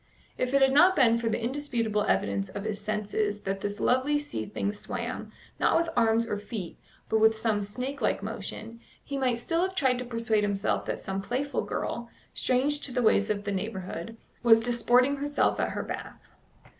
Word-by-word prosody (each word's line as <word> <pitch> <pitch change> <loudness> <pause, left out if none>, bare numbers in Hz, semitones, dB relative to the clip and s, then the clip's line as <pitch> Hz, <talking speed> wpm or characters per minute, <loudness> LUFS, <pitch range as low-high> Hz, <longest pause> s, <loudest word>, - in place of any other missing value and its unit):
If 255 +2 -1
it 275 - +5
had 265 0 +4
not 360 +6 +6
been 235 -6 +4
for 230 -1 -1
the 220 - 0
indisputable 235 -4 -1
evidence 100 0 0
of 200 - -6
his 215 -1 -3
senses 210 0 -1
that 195 0 -3
this 205 +1 -3
lovely 260 +4 +2
sea 290 -6 -4
thing 205 0 -2
swam, 210 - -5 0.3
not - - +4
with 335 0 +1
arms 230 -1 +3
or 205 -2 -2
feet, 205 -4 -6 0.3
but 220 - +2
with 220 0 +5
some 220 -2 +1
snake 250 +7 -4
like 205 - 0
motion, 225 +2 -6 0.2
he 280 - -5
might 255 -3 +1
still 330 +8 -1
have 375 +1 -1
tried 260 -6 +2
to 250 - -4
persuade 230 -3 0
himself 200 0 0
that - - -1
some 195 0 -4
playful 260 +7 -2
girl, 235 0 -4 0.2
strange 275 +4 +1
to 270 - -2
the 250 0 0
ways 210 -1 +3
of 205 -1 -1
the 200 - -2
neighbourhood, 190 0 -4 0.2
was 225 -2 +7
disporting 245 +3 +3
herself 290 +1 +1
at - - +1
her - - -3
bath. - - -8
230 Hz, 195 wpm, -28 LUFS, 210-255 Hz, 0.3 s, was